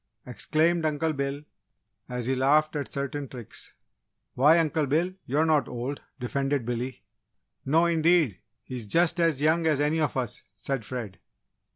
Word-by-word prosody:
exclaimed 160 +6 +1
Uncle 155 +1 0
Bill, 140 0 -3 0.7
as 125 -1 -3
he 130 - +1
laughed 150 +4 +3
at 145 -1 -3
certain 140 0 -3
tricks. 120 -4 -9 0.6
"Why, 150 +6 +5
Uncle 155 -2 +1
Bill! 165 +7 +1
You're 150 +5 +2
not 155 -5 +2
old," 125 +4 -4 0.2
defended 135 +1 -1
Billy. 120 0 -4 0.6
"No 160 +5 +4
indeed, 165 - +3 0.2
he 130 +1 -6
is 115 -3 -7
just 170 - +2
as 165 -4 +2
young 160 +1 +3
as 150 -3 +2
any 150 +2 +1
of 150 - 0
us!" 125 -5 -3 0.2
said 130 +3 -3
Fred. 105 -7 -6
145 Hz, 155 wpm, -27 LUFS, 130-160 Hz, 0.7 s, Why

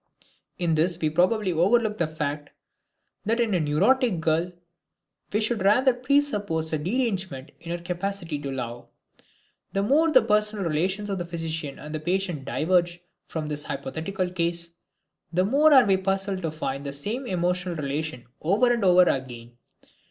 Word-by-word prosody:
In 170 -3 +1
this 165 +2 +3
we 155 -2 0
probably 185 +4 +2
overlook 210 +6 +2
the 170 - +2
fact 150 -2 -4 0.7
that 225 +3 0
in 230 -3 +1
a 180 - +2
neurotic 190 - +2
girl 160 +2 0 0.8
we 210 - +1
should 220 0 0
rather 245 +7 +4
presuppose 240 - 0
a 155 - +1
derangement 185 - -2
in 170 - -10
her 170 0 -4
capacity 175 -3 -3
to 140 - -5
love. 120 -2 -5 0.9
The 195 - +1
more 310 +9 +3
the 255 -5 +6
personal 210 -2 +1
relations 185 +6 -1
of 175 -3 -3
physician 160 -3 -4
and 155 0 -6
patient 175 -5 -1
diverge 175 +3 +1 0.3
from 155 -2 -4
this 150 -1 -3
hypothetical 180 +6 -3
case, 170 -1 -2 0.6
the 180 +2 +2
more 290 +8 +4
are 265 -4 +8
we 195 -1 +3
puzzled 195 0 -1
to 165 - -1
find 140 -3 -4
the 140 -1 -5
same 220 - -4
emotional 180 -1 -1
relation 145 -3 -3 0.2
over 215 +9 +3
and 235 -3 -1
over 180 -1 +6
again. 120 -6 -3
180 Hz, 155 wpm, -25 LUFS, 155-205 Hz, 0.9 s, are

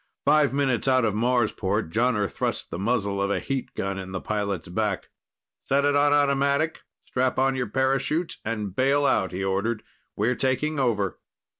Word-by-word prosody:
Five 150 0 +4
minutes 135 -3 0
out 130 -2 +4
of 105 - +1
Marsport, 110 -5 0
Jonner 115 -2 +1
thrust - - -3
the 85 - -4
muzzle 100 -2 0
of 100 - 0
a 100 - 0
heat 135 -2 -4
gun 95 0 -2
in 95 0 -7
the 95 - -2
pilot's 100 -5 -2
back. 100 +2 -2 0.5
"Set 140 +1 +1
it 145 0 +3
on 145 0 +4
automatic, 140 +2 +2 0.2
strap 130 0 0
on 135 0 +2
your 125 -3 -1
parachute 135 - 0
and 105 -4 -3
bail 140 +2 +3
out," 95 -8 +2
he 95 +2 -3
ordered. 100 +4 -1 0.3
"We're 115 +5 +1
taking 135 +4 0
over." 105 -8 0
125 Hz, 170 wpm, -25 LUFS, 100-135 Hz, 0.5 s, Five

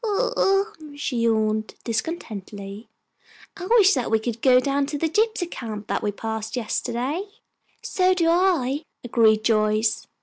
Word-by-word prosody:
"Ho 455 +3 0 0.4
hum!" 305 -3 -13
she 285 -3 -2
yawned, 220 -2 0
discontently. 215 - -5 0.7
"I 365 -2 -7
wish 420 -3 +6
that 255 -4 -1
we 220 - +3
could 225 +1 -4
go 255 -1 +6
down 275 +1 0
to 290 0 -3
the 325 - 0
gypsy 425 +2 +1
camp 215 -3 -6
that - - -1
we 210 - -1
passed 220 +1 -5
yesterday." 250 - -2 0.6
"So 370 0 +2
do 335 -2 +1
I," 330 -6 +2 0.2
agreed 220 -3 +3
Joyce. 215 0 +1
245 Hz, 145 wpm, -23 LUFS, 220-330 Hz, 0.7 s, wish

